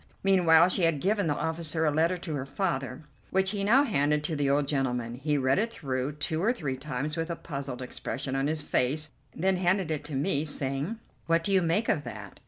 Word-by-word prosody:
Meanwhile 175 -3 +5
she 185 - 0
had 165 -4 +2
given 200 +2 +1
the 145 - +1
officer 160 0 0
a 150 - +3
letter 165 +4 +2
to 170 -2 -5
her 135 -2 -3
father, 140 -4 -2 0.3
which 190 0 +1
he 205 -2 -2
now 240 +8 +5
handed 150 - +1
to 155 +1 -2
the 145 -2 +1
old 140 0 +2
gentleman. 125 -5 -1
He 145 +4 -1
read 130 +2 +2
it 230 +2 0
through 135 - -3
two 155 +2 -2
or 220 +5 +3
three 150 - -3
times 145 +2 -3
with 165 0 -3
a 170 - -2
puzzled 135 -6 -5
expression 135 +1 -4
on 135 +1 +1
his 155 0 -1
face, 150 +3 0 0.2
then 190 +2 +1
handed 180 -1 +1
it 150 -2 -2
to 150 -2 -5
me, 145 +1 +1
saying: 145 +6 -1 0.3
"What 165 0 +2
do 200 - -1
you 190 -1 +5
make 175 +7 +1
of 145 - +1
that?" - - -8
155 Hz, 220 wpm, -28 LUFS, 140-175 Hz, 0.3 s, Meanwhile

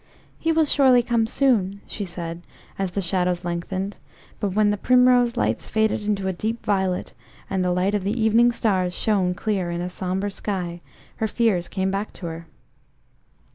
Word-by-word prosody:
"He 325 - +1
will 320 -1 +3
surely 260 -4 +5
come 230 -2 +1
soon," 215 -7 +1
she 205 - -5
said, 170 -1 -6 0.4
as 195 -1 0
the 200 +3 -2
shadows 180 0 0
lengthened; 185 +3 -3 0.4
but 200 -3 -1
when 210 -1 +4
the 205 - -1
primrose 250 +1 +4
lights - - 0
faded 220 -1 0
into 195 -2 0
a 190 - 0
deep 220 +6 -3
violet, 190 -3 0 0.4
and 190 -1 +1
the 180 - +1
light 180 +3 +1
of 205 -2 0
the 210 +5 -1
evening 225 +2 +4
stars 185 -6 0
shone 190 -4 +1
clear 195 -3 -1
in 170 0 -3
a 175 +1 -3
sombre 190 +2 -2
sky, 180 -4 -4 0.4
her 220 - 0
fears 210 -6 +1
came 190 -1 -1
back 200 +2 -3
to 180 - -9
her. 165 0 -6
195 Hz, 175 wpm, -23 LUFS, 180-220 Hz, 0.4 s, surely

